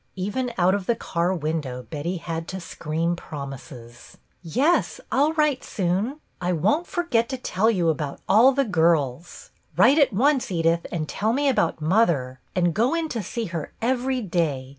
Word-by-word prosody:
Even 210 +7 -2
out 185 +1 +4
of 200 -2 -2
the 235 - +2
car 175 -4 -1
window 150 -7 -3
Betty 165 +7 -4
had 165 -1 -5
to 190 - -5
scream 165 0 -2
promises, 135 -6 -9
— - - -41
"Yes, 260 - +1
I'll 290 +4 +3
write 300 -4 +1
soon. 200 - -1 0.2
I 180 0 0
won't 215 - +1
forget 245 -10 0
to 260 - -3
tell 220 -3 +1
you 180 -7 +1
about 150 -3 -1
all 235 +6 +6
the 275 +1 +1
girls. 165 - 0 0.3
Write 290 +4 +6
at 285 - +4
once, 265 +6 +2
Edith, 165 -1 +1
and 155 -3 -2
tell 215 +7 -1
me 285 +3 +1
about 170 - +1
mother, 155 - +1 0.2
and 175 -2 +2
go 235 - +2
in 330 -1 -1
to 230 - -3
see 230 +4 -4
her 160 -3 -4
every 255 +1 0
day. 160 -8 -1
180 Hz, 175 wpm, -24 LUFS, 160-245 Hz, 0.3 s, all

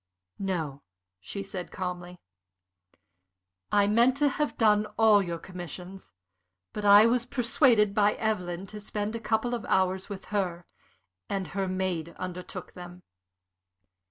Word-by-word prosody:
"No," 160 -8 -3 0.4
she 195 - -6
said, 190 -2 -7
calmly. 180 -1 -5 1.5
"I 205 -1 +4
meant 235 +5 +3
to 290 0 +3
have 295 +2 -2
done 210 -2 +3
all 220 -2 +6
your 170 -3 -3
commissions. 180 +2 -9 0.6
But 210 - -4
I 205 +1 +8
was 240 +1 +2
persuaded 235 -4 +3
by 210 0 +3
Evelyn 185 -4 -2
to 210 - -6
spend 210 +1 -4
a - - -3
couple 230 +2 0
of 235 - -3
hours 190 0 +1
with 195 -2 -7
her, 175 -4 -1 0.6
and 190 -4 -2
her 195 +3 -2
maid 185 -3 -2
undertook 180 0 -7
them." 180 0 -11
195 Hz, 130 wpm, -28 LUFS, 180-215 Hz, 1.5 s, I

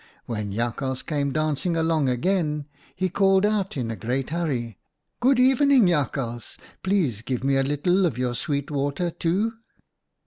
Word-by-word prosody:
When 105 -3 -4
Jakhals 120 +4 -2
came 145 -3 -1
dancing 155 +3 0
along 160 -4 +2
again, 150 +2 0 0.3
he 185 - 0
called 195 +1 +3
out 205 -6 0
in 120 -3 -2
a - - -4
great 125 +7 -2
hurry, 160 -7 0
■ 115 -3 -9 0.4
Good 255 +1 +3
evening, 265 -1 +5
Jakhals! 135 -8 -1 0.2
Please 175 - 0
give 125 +2 -3
me 135 0 +2
a 135 - +3
little 175 +7 +2
of 130 -8 -4
your 125 -1 -1
sweet 140 +3 -2
water, 145 +5 -1
too!' 195 +8 0
150 Hz, 160 wpm, -24 LUFS, 130-185 Hz, 0.4 s, evening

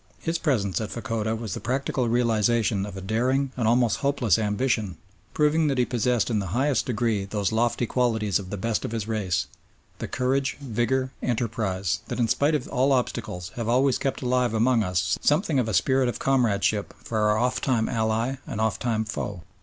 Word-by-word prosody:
His 165 0 -2
presence 110 - 0
at 110 - -4
Fachoda 115 -3 -2
was 110 -4 -5
the - - -4
practical 130 -1 -1
realisation 115 -3 +1
of 100 - -8
a - - -6
daring 130 +7 0
and 120 -4 0
almost 120 -1 +3
hopeless 130 - +2
ambition, 105 -2 0 0.4
proving 150 +1 +3
that 135 -2 0
he 125 - +3
possessed 120 -1 0
in 110 - +1
the 100 - -3
highest 140 +1 +1
degree 115 -4 0
those 100 -1 -1
lofty 120 +2 +1
qualities 110 -5 +1
of 95 -2 -8
the 105 - -4
best 115 +3 -1
of - - -4
his 110 -2 -3
race, 95 -6 -1 0.5
the - - -4
courage, 130 +2 0
vigour, 130 0 -1
enterprise, 110 -6 -1
that - - -4
in 120 - +3
spite 145 +7 +2
of 135 - -2
all 130 +3 +2
obstacles 110 -7 -2
have 115 -1 -2
always 130 +2 +3
kept 135 -1 -2
alive 125 -2 +1
among 115 +1 +3
us 90 -2 0
something 150 -1 +2
of 115 -3 0
a - - -1
spirit 130 +6 +3
of - - -3
comradeship 110 -6 +1
for 110 - -2
our 105 0 +3
oft 125 +3 0
time 120 -5 +1
ally 115 +3 0
and 110 - -4
oft 110 -3 0
time 110 -2 0
foe. 100 -4 -5
115 Hz, 195 wpm, -25 LUFS, 105-130 Hz, 0.5 s, almost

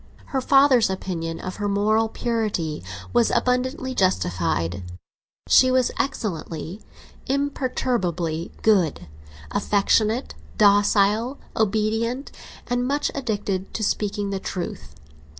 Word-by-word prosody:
Her 265 - +1
father's 270 -5 +5
opinion 170 -3 -4
of 185 -1 -6
her 205 -1 -1
moral 215 +2 +2
purity 215 - -2 0.3
was 235 - +4
abundantly 255 +1 0
justified; 90 - 0 0.7
she 255 - +6
was 255 -1 +2
excellently, 180 - -3 0.5
imperturbably 240 - -1
good; 180 - +2 0.4
affectionate, 215 - +1 0.2
docile, 205 +4 +3 0.2
obedient, 220 +5 0 0.3
and 245 0 -1
much 290 +2 0
addicted 205 -7 -3
to 220 - -2
speaking 205 -1 -1
the 195 - -2
truth. 175 - -6
210 Hz, 95 wpm, -23 LUFS, 185-250 Hz, 0.7 s, she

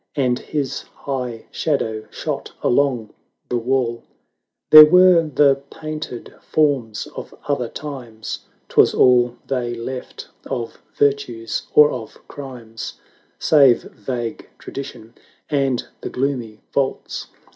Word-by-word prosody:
And 125 -3 +1
his 145 -4 -3
high 125 -5 -5
shadow 110 -8 -1
shot - - -5
along 125 -5 +1 0.4
the 120 - 0
wall: 120 -1 0 0.7
There 155 0 +13
were 180 +1 +7
the 140 -1 +4
painted 155 -5 -7
forms 135 -8 0
of - - -8
other 135 -5 0
times, 120 -7 -7 0.3
'Twas - - +4
all 125 -1 +4
they 120 -3 -2
left 125 +2 -7 0.2
of 120 -4 -5
virtues 125 -6 0
or 150 0 +8
of 115 -4 -7
crimes, 125 -5 -8 0.4
Save 140 -6 +5
vague 120 +1 -5
tradition; 120 -4 -8 0.4
and 135 -4 0
the - - -4
gloomy 125 -5 -3
vaults 135 -1 -2
Canto - - -30
i. - - -33
130 Hz, 115 wpm, -21 LUFS, 115-140 Hz, 0.7 s, There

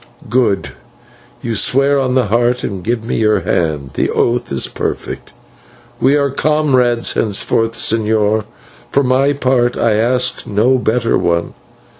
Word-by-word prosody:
"Good. 120 -6 +1 0.7
You 115 - -2
swear 140 +6 +2
on 130 -1 -1
the 130 -2 +2
Heart, 120 +4 0
and 95 -3 -5
give 115 +1 -2
me 115 - -3
your 110 -1 +2
hand 75 -5 -2
the - - -1
oath 120 +1 -1
is 65 -2 +1
perfect. - - -5 0.7
We 135 +3 +3
are 140 -2 +1
comrades 130 -5 +1
henceforth, 115 +2 0
señor; 110 -1 +1 0.4
for 140 - +1
my 135 +2 +2
part 130 -3 0
I 115 -2 +2
ask 125 +3 0
no 115 +6 +2
better 115 0 0
one. 85 0 -1
120 Hz, 140 wpm, -15 LUFS, 110-130 Hz, 0.7 s, We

